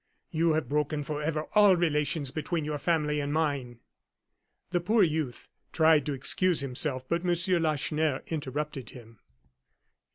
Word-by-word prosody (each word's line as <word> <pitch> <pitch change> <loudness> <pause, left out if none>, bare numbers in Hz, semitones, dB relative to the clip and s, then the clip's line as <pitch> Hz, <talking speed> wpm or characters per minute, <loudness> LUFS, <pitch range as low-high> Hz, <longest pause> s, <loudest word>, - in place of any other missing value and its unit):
You 165 0 +2
have 155 0 -1
broken 150 0 -1
forever 150 +1 -3
all 205 -2 +6
relations 150 -4 0
between 155 +1 -3
your 150 -1 -3
family 150 -2 0
and 145 0 -3
mine." 140 -6 -2 0.9
The 175 -1 0
poor 215 +4 +3
youth 155 -7 -2 0.2
tried 160 -3 +3
to 145 - -1
excuse 170 +5 +2
himself, 130 0 +1
but 170 +3 0
M. 175 -1 +1 0.3
Lacheneur 155 -2 0
interrupted 145 -4 -4
him. 115 -3 -14
150 Hz, 135 wpm, -28 LUFS, 140-160 Hz, 0.9 s, all